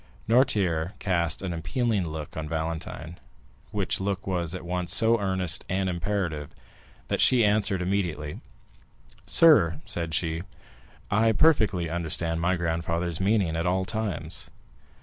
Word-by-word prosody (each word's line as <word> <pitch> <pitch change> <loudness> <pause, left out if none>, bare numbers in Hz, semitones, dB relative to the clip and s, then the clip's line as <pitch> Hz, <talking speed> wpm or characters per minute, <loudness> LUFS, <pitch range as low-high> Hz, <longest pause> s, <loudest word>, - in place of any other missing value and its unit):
Noirtier 100 -8 +2
cast 85 -3 -1
an 90 -2 -3
appealing 100 +3 -1
look 75 -2 -7
on 75 -1 -5
Valentine, 80 +1 -5 0.5
which - - -1
look 95 0 -3
was 90 -3 -2
at 90 - -7
once 90 0 0
so 115 +2 +4
earnest 95 -3 0
and 95 +1 0
imperative, 85 -4 -2 0.6
that - - 0
she 120 -4 +6
answered 100 -3 +1
immediately. 85 -6 -2 0.9
"Sir," 110 - +6
said 85 -2 -2
she, 80 -1 -1 0.7
"I 110 +2 +3
perfectly 105 - +3
understand 80 0 -1
my 90 +2 +2
grandfather's 85 -1 -2
meaning 95 -4 +1
at 85 +2 -1
all 95 +1 +1
times." 110 -5 -3
90 Hz, 130 wpm, -26 LUFS, 80-100 Hz, 0.9 s, she